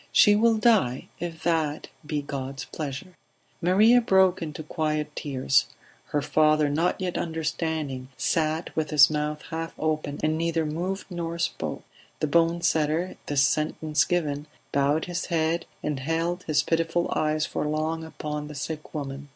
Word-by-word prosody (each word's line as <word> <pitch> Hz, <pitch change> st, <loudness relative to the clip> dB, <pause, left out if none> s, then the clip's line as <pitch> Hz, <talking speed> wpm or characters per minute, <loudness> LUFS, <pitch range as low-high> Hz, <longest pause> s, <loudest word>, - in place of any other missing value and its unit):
"She 205 Hz, -, +6 dB
will 225 Hz, +1 st, +4 dB
die 210 Hz, -, +2 dB
if 165 Hz, -2 st, -5 dB
that 160 Hz, -3 st, 0 dB
be 150 Hz, -1 st, -2 dB
God's 135 Hz, -2 st, -5 dB
pleasure." 150 Hz, +6 st, -6 dB, 0.5 s
Maria 215 Hz, +8 st, +5 dB
broke 190 Hz, -4 st, +4 dB
into 155 Hz, -1 st, -5 dB
quiet 155 Hz, -1 st, -2 dB
tears; 135 Hz, -3 st, +1 dB, 0.4 s
her 145 Hz, -1 st, -1 dB
father, 155 Hz, 0 st, +3 dB
not 165 Hz, +5 st, +1 dB
yet 185 Hz, -2 st, -2 dB
understanding, 160 Hz, -4 st, -2 dB
sat 160 Hz, 0 st, 0 dB
with 155 Hz, -2 st, -1 dB
his 150 Hz, 0 st, +7 dB
mouth 150 Hz, 0 st, -2 dB
half 165 Hz, 0 st, -4 dB
open, 155 Hz, -2 st, -2 dB
and 155 Hz, +1 st, +1 dB
neither 165 Hz, -1 st, 0 dB
moved 180 Hz, +6 st, -3 dB
nor 170 Hz, -1 st, -3 dB
spoke. 170 Hz, -, -3 dB, 0.4 s
The -, -, +1 dB
bone 170 Hz, +2 st, +2 dB
setter, 160 Hz, +3 st, +1 dB
this 140 Hz, -2 st, +3 dB
sentence 155 Hz, 0 st, +1 dB
given, 150 Hz, -3 st, -1 dB, 0.2 s
bowed 140 Hz, +3 st, +2 dB
his 175 Hz, 0 st, -3 dB
head 165 Hz, 0 st, 0 dB, 0.2 s
and 150 Hz, -3 st, -1 dB
held 165 Hz, +5 st, -1 dB
his 150 Hz, -2 st, +2 dB
pitiful 165 Hz, +1 st, 0 dB
eyes 155 Hz, 0 st, +1 dB
for -, -, -2 dB
long 155 Hz, +2 st, -1 dB
upon 150 Hz, -2 st, -5 dB
the 150 Hz, -, -9 dB
sick 155 Hz, +3 st, -6 dB
woman. 140 Hz, -1 st, -5 dB
155 Hz, 150 wpm, -26 LUFS, 150-170 Hz, 0.5 s, his